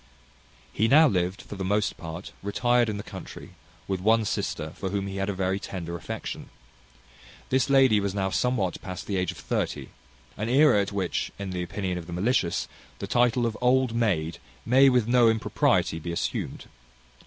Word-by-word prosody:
He 110 - +2
now 155 +6 +7
lived, 90 -4 -1
for - - -10
the 95 - -4
most 105 +2 0
part, 80 +2 -8
retired 120 +4 +2
in 105 - -3
the 100 - -6
country, - - -10 0.4
with 95 -1 -1
one 110 +3 +3
sister, 80 -5 -3
for 95 - -5
whom 100 0 -2
he 100 0 -5
had 95 +1 -1
a - - -1
very 95 +1 -1
tender 85 -3 -6
affection. 85 - -6 1.0
This 130 0 +2
lady 135 -6 +5
was 100 -1 -2
now 95 -1 -1
somewhat 110 -8 0
past 90 -2 -7
the 100 - -3
age 90 -2 0
of - - -13
thirty, - - -3 0.5
an 105 +3 -2
aera 130 -4 +5
at 100 - -3
which, 95 -3 -2
in 100 -1 -5
the 90 -1 -3
opinion 90 0 -3
of 85 - -10
the 85 - -7
malicious, 90 -1 0 0.3
the - - -5
title 120 +2 +2
of 115 -2 -1
old 125 -1 +3
maid 90 -9 0 0.3
may 130 +3 +6
with 125 -4 +2
no 120 -1 +5
impropriety 110 -6 +1
be 85 +2 -5
assumed. 85 - -3
100 Hz, 185 wpm, -26 LUFS, 90-120 Hz, 1.0 s, now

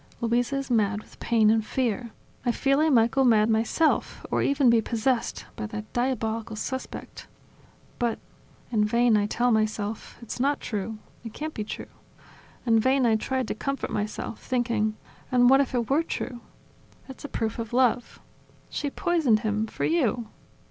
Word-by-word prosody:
Luisa 240 +3 +1
is 275 -1 -3
mad 210 -3 +2
with - - -17
pain 220 -2 +3
and 220 0 +2
fear... 235 0 -1 0.3
I 240 - +2
feel 275 +3 +2
I 315 +1 +4
might 235 -4 +4
go 270 - +2
mad 225 -3 +4
myself, 230 +9 +1
or - - +2
even 280 -1 +3
be 235 -1 +5
possessed 230 +2 -1
by 215 - -4
that 215 0 -7
diabolical 230 -3 -1
suspect... 260 +4 -6 0.7
But... 235 -3 0 0.5
In 215 -3 +3
vain 235 +1 +3
I 205 -1 +2
tell 240 +3 +1
myself: 215 -1 -1
It's 235 +1 -7
not 280 +3 +1
true! 215 0 -4 0.3
It 225 -2 -8
can't 310 +1 -5
be 215 - -3
true!... 210 - -6 0.8
In 225 -2 +4
vain 260 +3 +3
I 225 -2 +4
tried 260 +2 -1
to - - 0
comfort 275 +5 -3
myself, 210 +1 -4
thinking: 235 -4 0 0.4
And 245 0 +5
what 270 +1 +7
if 265 -2 -2
it 235 -2 0
were 285 +4 +3
true?... 260 -6 -4 0.7
It's 265 - -11
a 290 - -6
proof 225 -1 -2
of 225 -1 -4
love. 245 -1 +1 0.5
She 290 - -2
poisoned 295 - +2
him 215 0 -1
for - - -3
you! 245 -9 +1
235 Hz, 170 wpm, -26 LUFS, 220-260 Hz, 0.8 s, what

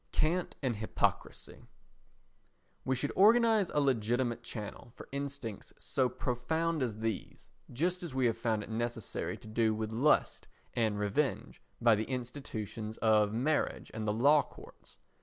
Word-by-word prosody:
Cant 170 +3 0
and 120 -5 0
Hypocrisy 110 +1 -2 1.2
We 130 - +1
should 145 +3 -2
organise 220 -1 +5
a - - +2
legitimate 120 -2 +1
channel 115 0 -7
for - - -11
instincts 140 -6 -5
so 130 -2 0
profound 135 +6 -1
as 115 -5 -1
these, 110 -3 -4 0.2
just 175 +8 0
as 170 -4 -5
we 130 -1 +2
have 115 -2 +2
found 115 -2 -1
it - - -9
necessary 120 0 -3
to - - -13
do 110 0 +1
with 110 0 -3
lust 130 +7 +2 0.3
and 110 -3 +1
revenge 105 +7 -1 0.2
by 120 -1 +5
the 110 +1 0
institutions 115 -4 -5
of 105 -2 +3
marriage 135 +7 0
and 110 -1 -4
the - - +3
law 140 +7 +5
courts. - - -14
120 Hz, 145 wpm, -32 LUFS, 110-140 Hz, 1.2 s, organise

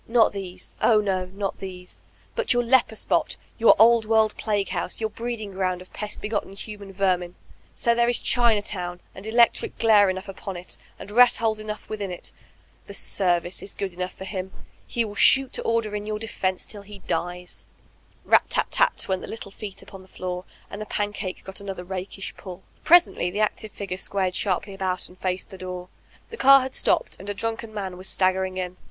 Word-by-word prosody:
Not 230 -1 +4
these, 185 -2 -7
oh 220 -2 +5
no, 190 -3 0
not 195 +1 -4
these. 180 -2 -8 0.3
But 475 - +3
your 245 0 +2
leper 240 -2 +3
spot, - - +1 0.2
your 230 - +7
Old 230 +1 +6
World 220 -1 +3
plague 205 -3 -1
house, - - -3
your 220 -1 -1
breeding 230 -3 -4
ground 185 -1 -1
of 185 - -14
pest 210 0 -5
begotten 210 -2 -2
human 200 -1 -8
ver 190 -1 +2
min 175 0 -7
1 - - -33 0.4
So 235 - +2
there 235 0 +3
is 245 - +5
Chinatown, 205 -7 +1
and 195 +3 -9
electric 235 +1 +3
glare 210 -3 +6
enot^ 185 +2 -6
upon 195 -1 -6
it, 175 - -7 0.2
and 205 - -9
rat 245 +2 +7
holes 220 -1 +1
enough 215 0 -6
within 205 -3 -4
it, 180 - -5 0.5
''the 200 - -7
service*' 175 -3 0
is - - -6
good 195 -2 -3
enough 180 +1 -4
foi 190 - -7
him, 190 -1 -4 0.2
— - - -33
he 235 -1 0
will 205 - -7
shoot 265 +5 +5
to - - -1
order 230 -2 0
in 210 0 -4
your 215 0 -2
defense 190 -4 -2
till 205 - -8
he 200 0 -11
dies 175 +1 -4 0.6
I - - -21
Rat - - +6
tat - - 0
tat - - +2
went 190 -1 0
the - - -7
little 210 -3 -7
feet 200 -1 -8
upon 195 - -11
the 185 - -17
floor, 180 0 -5 0.3
and 205 - -6
tiie 215 - -7
pancake 205 -2 -3
got 190 +1 -8
another 195 -2 -5
rakish 190 +1 -5
pulL 185 -1 -9 0.2
Presently 345 - +5
the 205 +4 -2
active 215 0 -1
figure 195 -2 -5
squared 190 -1 -1
sharply 195 +1 -1
about 185 -2 -2
and 180 - -17
faced 185 +2 -2
the 190 - -10
door. 180 -1 -6 0.4
The 460 - -8
car 275 -4 +8
had 260 0 -4
stopped, - - +2
and 195 - -8
a 205 - -2
drunken 225 +1 -3
man 195 -4 -5
was 185 +1 -4
staggering 185 0 +1
in. 180 -1 -4
200 Hz, 210 wpm, -25 LUFS, 185-220 Hz, 0.6 s, car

